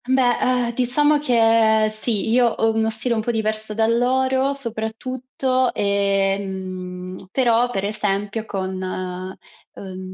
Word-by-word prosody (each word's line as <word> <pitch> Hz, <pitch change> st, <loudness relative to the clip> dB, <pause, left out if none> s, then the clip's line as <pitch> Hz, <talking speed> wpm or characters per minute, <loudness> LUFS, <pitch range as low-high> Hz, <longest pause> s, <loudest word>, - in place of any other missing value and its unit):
Beh, 255 Hz, -2 st, +3 dB
ehm, 250 Hz, -2 st, +1 dB
diciamo 290 Hz, +5 st, +2 dB
che 225 Hz, -4 st, +4 dB
sì, 215 Hz, -1 st, -2 dB
io 245 Hz, +1 st, +4 dB
ho 225 Hz, -1 st, +1 dB
uno 220 Hz, 0 st, +1 dB
stile 235 Hz, +2 st, -1 dB
un 220 Hz, -, 0 dB
po' 220 Hz, -, -4 dB
diverso 215 Hz, -1 st, -2 dB
dal 225 Hz, +1 st, +2 dB
loro, 260 Hz, +2 st, +1 dB
soprattutto, 255 Hz, +2 st, -2 dB
ehm, 190 Hz, -2 st, -2 dB
però, 240 Hz, +1 st, +2 dB
per 195 Hz, -5 st, -2 dB
esempio 205 Hz, +1 st, -2 dB
con, 190 Hz, -3 st, -4 dB, 0.9 s
uhm, 185 Hz, -1 st, -8 dB
225 Hz, 125 wpm, -21 LUFS, 200-245 Hz, 0.9 s, che